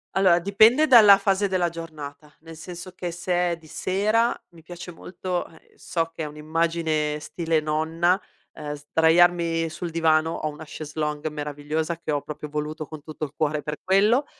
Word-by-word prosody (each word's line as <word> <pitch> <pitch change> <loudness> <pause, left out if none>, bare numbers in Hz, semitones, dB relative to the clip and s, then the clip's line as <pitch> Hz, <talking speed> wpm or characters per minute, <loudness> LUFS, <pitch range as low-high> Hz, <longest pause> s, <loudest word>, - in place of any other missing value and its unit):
Allora, 185 -3 +5
dipende 220 - +5
dalla 215 -7 +9
fase 195 0 +1
della 185 -2 +1
giornata, 150 -3 -9
nel 165 +1 -12
senso 175 +3 -9
che 180 -1 -5
se 175 +1 0
è 170 - -2
di 165 -1 -18
sera, 215 +8 +1 0.2
mi 165 - -16
piace 175 +1 -9
molto 180 +1 -4
a - - -16
ehm, 160 - -22
so 165 -1 -3
che 160 - -4
è - - -2
un'immagine 155 0 -1
stile 160 +1 -1
nonna, 160 +4 +1 0.3
ehm, 150 -1 -6
sdraiarmi 165 +2 +3
sul 170 +1 -6
divano, 160 -1 +2
ho 155 - -3
una 150 +1 -9
chaise 150 0 -8
longue 150 0 -2
meravigliosa 150 +2 -3
che 160 - -4
ho 145 -1 0
proprio 150 +1 -7
voluto 150 +1 -4
con 155 -2 -10
tutto 155 0 -5
il 140 - -12
cuore 150 -1 0
per 150 +1 -4
quello, 210 +8 +3
165 Hz, 180 wpm, -24 LUFS, 155-180 Hz, 0.3 s, dalla